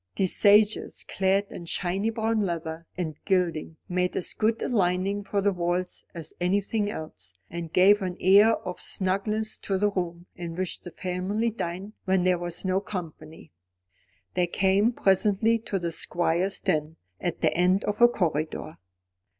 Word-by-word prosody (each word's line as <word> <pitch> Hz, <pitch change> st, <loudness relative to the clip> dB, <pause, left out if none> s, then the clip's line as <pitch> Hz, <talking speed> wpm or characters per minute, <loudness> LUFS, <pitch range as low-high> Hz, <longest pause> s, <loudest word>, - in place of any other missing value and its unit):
These 190 Hz, -2 st, 0 dB
sages, 210 Hz, +1 st, +3 dB
clad 195 Hz, +1 st, +1 dB
in 170 Hz, -, -8 dB
shiny 190 Hz, +5 st, -1 dB
brown 225 Hz, 0 st, 0 dB
leather 165 Hz, -3 st, -3 dB
and 160 Hz, -4 st, -3 dB
gilding, 170 Hz, -4 st, 0 dB
made 180 Hz, 0 st, 0 dB
as 180 Hz, -, 0 dB
good 225 Hz, +1 st, +1 dB
a -, -, 0 dB
lining 195 Hz, -2 st, +1 dB
for 200 Hz, 0 st, -1 dB
the 200 Hz, +1 st, +3 dB
walls 180 Hz, +1 st, -2 dB
as 165 Hz, -2 st, -7 dB
anything 205 Hz, +3 st, +1 dB
else, 95 Hz, -, -8 dB, 0.2 s
and 170 Hz, -1 st, -5 dB
gave 200 Hz, +4 st, +5 dB
an 180 Hz, -2 st, -3 dB
air 200 Hz, +4 st, +6 dB
of 180 Hz, -, -5 dB
snugness 210 Hz, +3 st, -1 dB
to 195 Hz, -, -1 dB
the 205 Hz, +2 st, +2 dB
room 175 Hz, -2 st, -3 dB
in 170 Hz, -2 st, -6 dB
which 185 Hz, 0 st, -3 dB
the 175 Hz, -, -9 dB
family 185 Hz, +6 st, -2 dB
dined 195 Hz, 0 st, -5 dB
when 190 Hz, -1 st, +2 dB
there 180 Hz, -1 st, +2 dB
was 175 Hz, +1 st, -3 dB
no 185 Hz, 0 st, +2 dB
company. 165 Hz, -5 st, -8 dB, 0.8 s
They 180 Hz, -1 st, +1 dB
came 195 Hz, +5 st, +2 dB
presently 210 Hz, +2 st, +2 dB
to 195 Hz, -, -1 dB
the 170 Hz, -2 st, -2 dB
Squire's 175 Hz, +3 st, +1 dB
den, 155 Hz, -3 st, -1 dB, 0.2 s
at 175 Hz, -, -3 dB
the -, -, +3 dB
end 180 Hz, +3 st, +3 dB
of 210 Hz, +2 st, -2 dB
a 240 Hz, -, +10 dB
corridor. 155 Hz, -7 st, -2 dB
185 Hz, 160 wpm, -26 LUFS, 175-205 Hz, 0.8 s, a